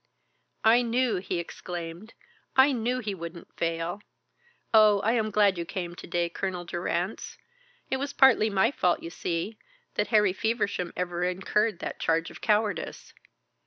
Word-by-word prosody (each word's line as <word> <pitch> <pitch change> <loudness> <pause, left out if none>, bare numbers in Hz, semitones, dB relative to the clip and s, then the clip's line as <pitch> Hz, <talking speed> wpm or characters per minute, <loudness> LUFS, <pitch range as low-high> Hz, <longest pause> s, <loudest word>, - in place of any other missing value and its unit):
"I 230 +2 +6
knew," 240 -2 +1
he 180 0 -3
exclaimed, 170 +3 -7 0.4
"I 265 +2 +6
knew 245 0 0
he 210 -3 -3
wouldn't 170 -1 -9
fail. 165 +3 -2 0.7
Oh, 215 -2 +7
I 220 - +2
am 225 -2 +1
glad 205 -3 +3
you - - -1
came 175 0 -5
to - - -10
day, 175 0 0
Colonel 180 0 -4
Durrance. 175 +3 -3 0.5
It 265 - +2
was 280 +1 -3
partly 255 -6 +5
my 200 +4 +3
fault, 180 -10 +1
you 165 - -6
see, 175 +6 -3 0.3
that - - 0
Harry 210 -4 +4
Feversham 205 -4 -1
ever 175 -1 -2
incurred 195 +3 0
that - - -5
charge 165 0 0
of - - -12
cowardice. 210 -1 -1
195 Hz, 155 wpm, -27 LUFS, 175-220 Hz, 0.7 s, Oh